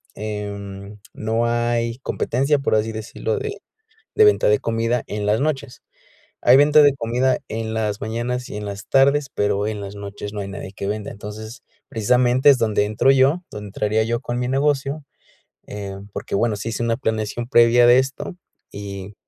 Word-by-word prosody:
eh, 100 -1 -6 0.2
no 115 +2 -1
hay 120 0 0
competencia, 140 +2 0
por 135 - +1
así 110 +1 0
decirlo, 110 0 -3
de 430 -1 -5 0.6
de 435 - +6
venta 420 - +4
de 105 - +4
comida 115 +1 -1
en 105 0 -3
las 105 +3 +2
noches. 140 -4 -3 0.6
Hay 125 - +7
venta 150 +2 +6
de 145 -1 +6
comida 125 +2 +1
en 110 0 -4
las 105 -2 -2
mañanas 120 +3 -3
y - - -7
en 105 - -5
las 100 0 -7
tardes, 140 +1 +3
pero 105 0 0
en 105 -1 -4
las 100 0 -7
noches 100 0 -7
no 105 - -5
hay 100 - -5
nadie 100 -1 -7
que 100 0 -5
venda. 105 0 -3
Entonces, 110 +3 -9 0.3
precisamente, 125 +5 +3
es 135 - +4
donde 110 -3 +1
entro 110 +6 +2
yo, 140 +7 +3
donde 105 0 -8
entraría 105 +2 0
yo 120 +1 -1
con 120 -2 -4
mi 125 - -1
negocio, 140 +1 0 0.6
eh, 100 -2 -6 0.2
porque, - - -4
bueno, 115 0 +1
sí 100 +3 -5
hice 115 - -3
una 115 -1 +1
planeación 110 -1 -2
previa 120 -1 +5
de 125 +1 +7
esto, 135 +7 -3 0.3
y 100 0 -8
115 Hz, 180 wpm, -21 LUFS, 105-130 Hz, 0.6 s, Hay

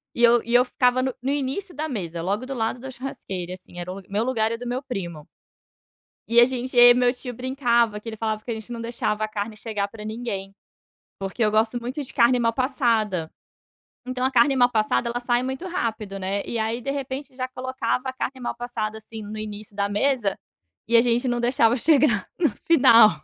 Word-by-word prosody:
e 240 - 0
eu 235 0 +6
e 235 - -4
eu 245 - +7
ficava 250 0 +2
no 265 -1 -1
no 260 - -2
início 290 +7 -3
da 310 +3 -2
mesa, 175 - -4
logo 200 +8 -1
do 270 - -5
lado 230 -1 -2
da 265 +2 -7
churrasqueira, 195 -8 -6
assim, 180 -1 -11
era 175 +1 -5
o 195 +1 -7
meu 205 +3 0
lugar 225 -3 0
e - - -1
o - - -8
do 245 +1 -7
meu 250 +2 -2
primo. 175 - -6 1.0
E 235 +1 +6
a - - +9
gente 255 0 -3
e - - +8
aí 245 0 +10
meu 245 0 +3
tio 250 0 -7
brincava, 240 -3 +1
que 225 - -9
ele 220 - -5
falava 215 -1 -2
que 240 - -7
a - - -1
gente 220 +2 -8
não 235 - -5
deixava 230 -2 -2
a - - -2
carne 215 0 -4
chegar 210 -2 -2
pra 210 +1 -10
ninguém. 215 -3 -5 0.7
Porque 195 +4 -3
eu 215 - +4
gosto 220 +3 +1
muito 255 +5 -4
de 265 - -8
carne 245 +1 +4
mal 230 -1 +2
passada. 230 - 0 0.8
Então 255 0 -2
a 260 - +2
carne 265 +2 +4
mal 245 0 +5
passada, 220 +1 +1
ela 240 +1 -2
sai 240 0 +1
muito 265 +7 -4
rápido, 220 - -3
né. 195 +1 -2
E 235 - -3
aí, 225 +2 -1
de 275 - -3
repente, 275 0 -5
já 255 -1 -2
colocava 255 0 -2
a - - -2
carne 260 +1 -4
mal 245 - -3
passada, 230 -3 -4
assim, 220 0 -9
no 210 +1 -7
início 210 -1 -7
da 200 -1 +1
mesa 215 0 0 0.5
e 235 - +6
a - - +7
gente 240 +1 +1
não 240 -1 0
deixava 240 -1 +3
chegar 270 - +3
no 330 -4 +3
final. 230 - +5
235 Hz, 225 wpm, -24 LUFS, 215-255 Hz, 1.0 s, aí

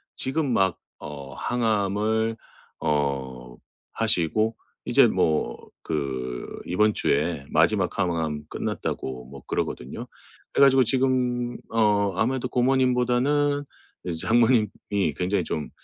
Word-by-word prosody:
지금 135 +1 -1
막 95 -4 +2 0.3
어 70 -2 -8
항암을 110 - 0 0.4
어 65 -4 -2 0.4
하시고 110 +1 +1 0.3
이제 - - +5
뭐 75 -6 +1 0.3
그 65 -5 -4
이번 105 +4 +3
주에 85 -8 0
마지막 - - +2
항암 80 -4 -1
끝났다고 65 -1 -4
뭐 70 +1 -11
그러거든요. 60 +2 -3 0.5
그래 - - +5
가지고 135 -1 +5
지금 125 -1 0
어 105 -3 +2
아무래도 125 +5 0
고모님보다는 130 +3 +2 0.4
이제 85 -3 -3
장모님이 110 - +2
굉장히 95 +1 0
좀 75 -2 -4
105 Hz, 235 characters per minute, -25 LUFS, 75-125 Hz, 0.5 s, 이제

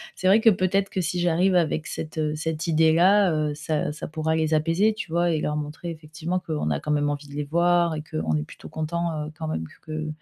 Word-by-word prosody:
c'est 185 - -1
vrai 195 +4 +6
que 225 - +7
peut-être 195 0 +1
que 190 - -2
si 175 +1 -2
j'arrive 175 +2 +2
avec 160 -2 +1
cette, 155 0 -6
heu, 155 -1 0
cette 160 +1 -3
idée 160 -1 +4
là, 190 +2 +5
heu, 150 -1 0
ça 150 0 -2
ça 150 - -6
pourra 160 0 -1
les 160 0 +1
apaiser 165 +8 +3
tu 175 - -7
vois 170 +1 +2
et 155 - 0
leur 150 - -1
montrer 150 +3 -5
effectivement 160 +3 -4
qu'on 155 - -3
a 70 -2 0
quand 150 - -3
même 145 0 +2
envie 145 0 -4
de 140 - -12
les 150 +1 -2
voir 170 +2 +2
et 150 - -5
qu'on 80 0 -1
est 75 - -2
plutôt - - -12
content, 160 -1 -2
heu, 155 - -8
quand 160 - -4
même 80 - -3
que - - -18
que, 155 0 -3
160 Hz, 255 wpm, -25 LUFS, 150-175 Hz, -, que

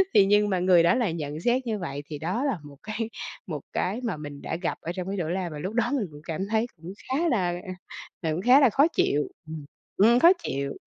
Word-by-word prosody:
Thì 195 - +7
nhưng 205 +1 +3
mà 185 -2 +1
người 180 -2 +5
đó 205 +9 +4
lại 225 -10 0
nhận 150 -1 -4
xét 245 +5 +1
như 215 -2 -1
vậy, 145 -4 -5
thì 150 -2 -7
đó 185 - -1
là 270 -10 0
một 145 -1 -12
cái 220 +1 -3 0.4
một 155 -5 -4
cái 205 +7 -1
mà 215 -9 -2
mình 145 -1 -8
đã - - -3
gặp 175 +1 -2
ở 165 - -4
trong 185 0 -4
cái 200 +1 -3
chỗ 165 - -1
làm 180 -2 -2
và 150 - -6
lúc 190 +7 -4
đó 240 +1 +1
mình 215 -8 -1
cũng 145 0 -12
cảm 165 +4 -3
thấy 220 +1 +2
cũng 170 +4 -9 0.2
khá 320 +6 +1
là 190 -8 +1 0.2
ờ, 185 - -5 0.5
ờ, 160 -2 -1
cũng 165 - -2
khá 250 +7 +7
là 270 - +6
khó 280 +8 +4
chịu. 150 - +1 0.2
Ừm. 155 -2 -7 0.3
Ừm, 230 +4 +6
khó 340 +6 +8
chịu. 140 0 -2
185 Hz, 260 wpm, -26 LUFS, 160-230 Hz, 0.5 s, khó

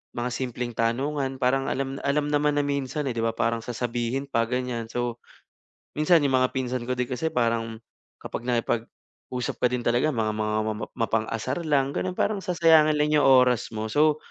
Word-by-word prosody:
mga 120 +1 -2
simpleng 125 -2 -3
tanungan, 135 +4 -1
parang 135 +1 +1
alam 135 0 -3
alam 145 +1 +1
naman 145 0 +2
na 145 - +2
minsan, 140 0 -2
eh, - - -2
'di 115 - -2
ba 115 - +1
parang 115 0 0
sasabihin 120 +2 -2
pa 115 -4 0
ganyan. 125 -2 -2
So, 120 0 -3 0.7
minsan 155 +2 +4
'yung 135 - +1
mga 130 0 +3
pinsan 125 -2 -2
ko 125 - -1
din 125 - 0
kasi 135 +6 -2
parang 115 -3 0 0.4
kapag - - -6
nakipag-usap 120 +1 -3
ka 125 - +5
din 125 -1 -3
talaga 120 +6 +2
mga 110 -6 -1
mga 105 0 -1
mamap 110 0 -3
mapang-asar 115 +5 -1
lang 140 -1 +2
gano'n. 185 -1 -3
Parang 205 -2 0
sasayangin 160 -4 +4
lang 150 0 +2
'yung 150 -2 +4
oras 125 -3 +4
mo 110 0 -4
so, 150 +3 +3
125 Hz, 180 wpm, -25 LUFS, 115-145 Hz, 0.7 s, ka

